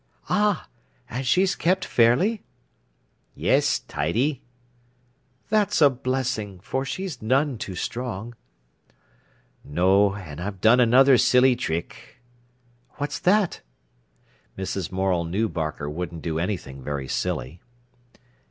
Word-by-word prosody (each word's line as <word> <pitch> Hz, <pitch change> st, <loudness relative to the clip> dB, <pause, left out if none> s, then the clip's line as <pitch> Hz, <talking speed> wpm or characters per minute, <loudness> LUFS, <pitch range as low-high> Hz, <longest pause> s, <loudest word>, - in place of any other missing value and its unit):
"Ah! 210 Hz, -4 st, +1 dB, 0.4 s
And 130 Hz, +2 st, -3 dB
she's 185 Hz, +7 st, +3 dB
kept 185 Hz, +2 st, 0 dB
fairly?" 155 Hz, -, +3 dB, 0.9 s
"Yes, -, -, +2 dB
tidy." 120 Hz, -, -1 dB, 1.1 s
"That's 215 Hz, -2 st, +2 dB
a 145 Hz, -3 st, +6 dB
blessing, 125 Hz, -6 st, -3 dB
for 130 Hz, +8 st, -3 dB
she's 180 Hz, -1 st, -5 dB
none 130 Hz, +2 st, +1 dB
too 95 Hz, -, -5 dB
strong." 120 Hz, +1 st, -4 dB, 1.3 s
"No. 95 Hz, +6 st, +3 dB
An' 80 Hz, -7 st, -9 dB
I've 95 Hz, +1 st, -5 dB
done 115 Hz, +5 st, +5 dB
another 125 Hz, +2 st, +6 dB
silly 125 Hz, 0 st, +5 dB
trick." 85 Hz, +2 st, -5 dB, 0.7 s
"What's 145 Hz, -1 st, -4 dB
that?" 195 Hz, 0 st, +2 dB, 1.0 s
Mrs. 95 Hz, -1 st, -4 dB
Morel 95 Hz, -2 st, 0 dB
knew 95 Hz, +7 st, -1 dB
Barker 75 Hz, -5 st, -4 dB
wouldn't 85 Hz, +1 st, -5 dB
do 80 Hz, -1 st, -2 dB
anything 85 Hz, -8 st, -4 dB
very 70 Hz, -1 st, -4 dB
silly. 80 Hz, +6 st, -3 dB
115 Hz, 105 wpm, -24 LUFS, 90-135 Hz, 1.3 s, a